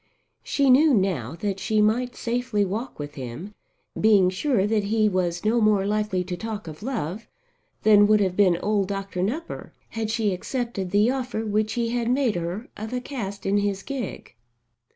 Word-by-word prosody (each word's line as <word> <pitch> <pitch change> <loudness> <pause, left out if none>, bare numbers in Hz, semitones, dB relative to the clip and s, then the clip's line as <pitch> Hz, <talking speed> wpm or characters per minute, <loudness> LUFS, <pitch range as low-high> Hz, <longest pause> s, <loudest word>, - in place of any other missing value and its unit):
She 275 -2 +2
knew 285 +2 +6
now 170 - 0
that 200 -2 -2
she 215 +1 0
might 240 +4 +2
safely 235 -3 -1
walk 220 +7 -4
with 145 0 -6
him, 140 - -7 0.5
being 200 -4 +5
sure 200 +1 +1
that 210 -1 +1
he 215 +1 +2
was 180 -2 -1
no 230 +2 +3
more 210 -2 +3
likely 210 -3 0
to 180 0 -4
talk 215 -1 -6
of 155 +2 -9
love 220 - -4 0.6
than 205 -1 +6
would 215 0 +5
have 190 -3 +1
been 185 -4 +4
old 205 -2 +1
Dr. 195 -2 -4
Nupper 285 - -4 0.2
had 225 -1 -3
she 215 -3 +1
accepted 230 -1 -3
the 205 +5 +3
offer 250 -4 -3
which 215 0 0
he 235 -1 -1
had 235 0 -1
made 255 -3 +2
her 175 +6 -4
of 220 +2 -6
a 250 - 0
cast 220 -7 -6
in 200 +1 +2
his 200 -1 -1
gig. 265 -8 -6
210 Hz, 180 wpm, -24 LUFS, 190-230 Hz, 0.6 s, knew